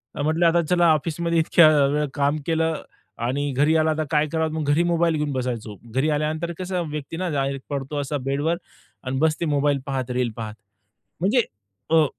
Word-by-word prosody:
अ, - - -3
म्हंटलं 160 +3 +2
आता 170 +1 +4
चला 175 -2 +4
ऑफिसमध्ये 170 +2 0
इतक्या 160 0 +6 0.2
वेळ 150 +1 +1
काम 145 +1 +1
केलं 160 -1 0 0.5
आणि 145 +2 -1
घरी 145 +4 +2
आला 160 0 +2
आता 155 - -2
तर - - -9
काय 150 0 +3
करावं. 160 0 0
मग 155 -2 -2
घरी 165 +4 +3
मोबाईल 170 -1 +2
घेऊन 150 -1 -1
बसायचो. 120 -5 -3 0.2
घरी 145 +4 +2
आल्यानंतर 155 +3 -1
कसं 180 -3 -2
व्यक्ती 150 +2 -5
ना 185 0 -2
डायरेक्ट 135 -2 -2
पडतो 140 0 -3
असा 145 +1 -2
बेडवर 145 +5 0 0.5
आणि 130 +1 -2
बसते 160 +2 +1
मोबाईल 145 -1 +1
पाहत, 130 -3 -3
रील 125 -2 0
पाहत. 110 -2 -6 0.7
म्हणजे 215 +8 +3 0.5
अ 160 -1 +5
150 Hz, 185 wpm, -23 LUFS, 140-165 Hz, 0.7 s, इतक्या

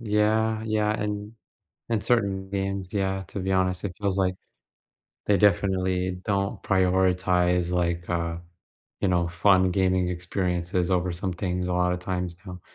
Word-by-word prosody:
Yeah, 110 0 +1
yeah, 105 -1 +1
and 105 +1 -4 0.6
and 110 -3 0
certain 100 -5 0
games, 95 -1 -3
yeah, 95 -1 -1
to - - -6
be 95 0 -2
honest, 95 -1 +1
it 95 -4 -4
feels 100 -2 -1
like 95 -1 +1 0.9
they 105 - +4
definitely 95 -1 +1
don't 100 -1 -1
prioritize, 90 -2 +2
like, 85 -1 -1
uh, 85 -1 -1 0.6
you 100 - +2
know, 85 -2 +1
fun 95 +1 +3
gaming 95 -1 +2
experiences 90 0 -1
over 90 -1 +1
some 90 +2 -3
things 90 0 -2
a 90 - -1
lotta 90 0 +1
times 90 -1 -3
now, 90 -1 -8
95 Hz, 145 wpm, -26 LUFS, 90-100 Hz, 0.9 s, they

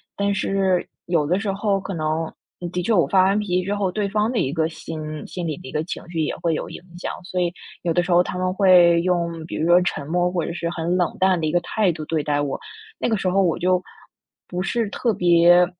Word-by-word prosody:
但 200 0 0
是 195 -2 +1 0.2
有 165 -4 +2
的 180 +6 +1
时 200 -1 -1
候 195 0 0
可 195 0 -6
能， 155 +1 -1 0.3
嗯， 175 - -4
的 180 - -1
确 225 - +1
我 175 -7 +4
发 185 +2 +4
完 195 +2 +3
脾 210 - -4
气 180 0 +1
之 200 +2 -2
后， 195 -3 0
对 205 0 -1
方 210 +3 0
的 245 - -2
一 135 +2 0
个 160 -1 +1
心 155 -2 -7
心 180 -2 -5
里 150 - -3
的 - - -11
一 - - -8
个 155 +1 -1
情 175 - -7
绪 165 -2 -2
也 150 - -1
会 165 -1 0
有 - - -3
影 - - -8 0.2
响。 - - -3
所 180 0 -2
以 175 -1 +1 0.3
有 170 - -1
的 175 - +3
时 180 - -3
候 175 +1 +6
他 180 - -5
们 185 0 0
会 180 -3 +6
用， 170 -2 -1
比 - - -6
如 160 - 0
说 175 +1 +6
沉 150 -5 -2
默， 175 +2 +1
或 175 -2 -1
者 170 - -4
是 170 -1 -3
很 170 +1 -1
冷 175 -2 0
淡 185 -2 +3
的 155 - 0
一 - - 0
个 175 - +3
态 195 0 +1
度 155 -1 -6
对 155 -2 -1
待 145 -1 0
我。 145 -2 -1 0.4
那 - - 0
个 220 - +1
时 190 - -2
候 195 +2 +3
我 175 -1 +1
就 180 +1 +2 0.7
不 180 0 -3
是 225 +1 -1
特 230 +3 0
别 175 0 +5
180 Hz, 285 characters per minute, -22 LUFS, 165-190 Hz, 0.7 s, 候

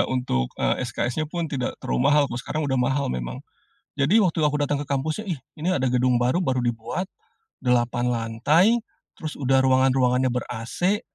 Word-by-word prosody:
untuk, 125 - 0
eee, - - 0
SKS-nya 150 +5 -2
pun 170 0 -3
tidak 130 -3 -3
terlalu 60 - +1
mahal, 150 0 +5
kalau 120 - -3
sekarang 155 +4 -3
udah 130 -2 0
mahal 135 - 0
memang. - - -5 0.6
Jadi, 160 +11 +4
waktu 165 -2 0
aku 150 0 +2
datang 145 0 0
ke 145 - -5
kampusnya, 155 +9 -2
"Ih, 165 -6 -2 0.2
ini 170 - -1
ada 130 -7 +1
gedung 125 0 +3
baru, 125 +8 +1
baru 130 -7 0
dibuat," 120 +10 -3 0.6
8 120 -1 +1
lantai, 125 - +2 0.4
terus 155 -2 -6
udah 135 -1 +3
ruangan-ruangannya 130 -1 +3
ber-ac, 125 - -2
130 Hz, 165 wpm, -24 LUFS, 120-150 Hz, 0.6 s, mahal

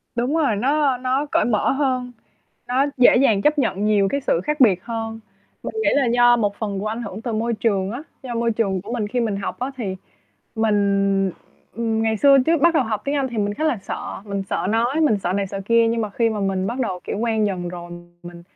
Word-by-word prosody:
Đúng 245 +6 0
rồi, 290 -9 +2
nó 275 +4 +1
nó 260 +3 -1
cởi - - +2
mở 220 -3 +1
hơn, 260 -3 -1 0.6
nó 255 +3 +1
dễ 250 -1 +6
dàng 225 -6 +3
chấp 300 0 +2
nhận 205 -7 0
nhiều 205 -2 +3
cái 280 - -1
sự 170 - 0
khác 300 -1 -2
biệt 195 -8 +4
hơn. 225 -1 -5 0.4
Mình - - -6
nghĩ - - +2
là 280 -3 +3
do 240 0 +5
một 205 -3 -1
phần 205 -3 -3
của 200 - -4
ảnh 225 +3 -3
hưởng 205 0 -7
từ 235 - -3
môi 230 +2 -1
trường 200 -4 0
á, 245 +6 -6 0.2
do 250 -2 -5
môi 235 0 0
trường 200 -4 -1
của 205 +5 -8
mình 220 -4 -2
khi 245 +3 -1
mình 220 -4 -1
học 195 - -5
á, 255 +2 -3
thì, 200 -7 -4 0.6
mình, 200 -3 +1 0.4
ừm, 225 -1 -1
ngày 220 0 +1
xưa 275 +4 +6
trước 330 -1 +3
bắt 340 0 +5
đầu 310 - +4
học 215 -2 -3
tiếng 280 - -1
Anh 275 -2 0
thì 235 -3 -5
mình 205 0 -1
khá 310 - -3
là 305 -8 +1
sợ, - - -6
mình 200 -2 -3
sợ - - -1
nói, 240 +7 +1
mình 245 -10 +3
sợ 180 -2 -2
này, 200 +1 -1
sợ 195 +1 -6
kia 230 0 +4
nhưng 230 0 0
mà 215 -2 -2
khi 230 +3 +1
mà 215 -2 -3
mình 190 -1 -1
bắt 240 +5 -3
đầu, 185 -7 -2
kiểu, - - -4
quen 220 -2 +1
dần 180 -3 -3
rồi, 175 0 -8 0.3
mình 175 0 -11
225 Hz, 245 wpm, -21 LUFS, 200-250 Hz, 0.6 s, dễ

